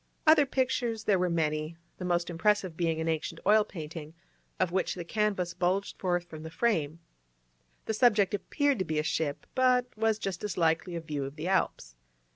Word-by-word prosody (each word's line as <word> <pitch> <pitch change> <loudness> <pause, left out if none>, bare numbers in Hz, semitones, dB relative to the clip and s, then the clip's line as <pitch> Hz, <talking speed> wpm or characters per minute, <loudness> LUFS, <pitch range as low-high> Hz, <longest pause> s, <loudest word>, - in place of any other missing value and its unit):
Other 310 -2 +6
pictures 250 -4 0
there 200 -4 +3
were 180 0 +1
many, 155 -1 -1 0.2
the 180 - -4
most 175 -1 0
impressive 185 0 +1
being 165 -1 0
an 160 - -2
ancient 165 +1 -2
oil 215 +1 +6
painting, 160 -4 -8 0.4
of 185 -2 +1
which 190 0 0
the 175 - -5
canvas 195 -2 -1
bulged 185 +3 -1
forth 175 -2 0
from 155 -3 -10
the 160 - -7
frame; 165 -6 0 0.9
the 220 - -1
subject 215 -4 +3
appeared 285 +4 0
to 185 - 0
be 155 - -2
a 150 - +1
ship, 160 -2 -2
but 255 -1 +3
was 220 0 +1
just 195 -4 -4
as 210 - -3
likely 165 +1 +1
a 170 - -3
view 150 -3 -4
of 135 +1 -6
the 155 +3 -4
Alps. - - -1
180 Hz, 190 wpm, -29 LUFS, 160-210 Hz, 0.9 s, Other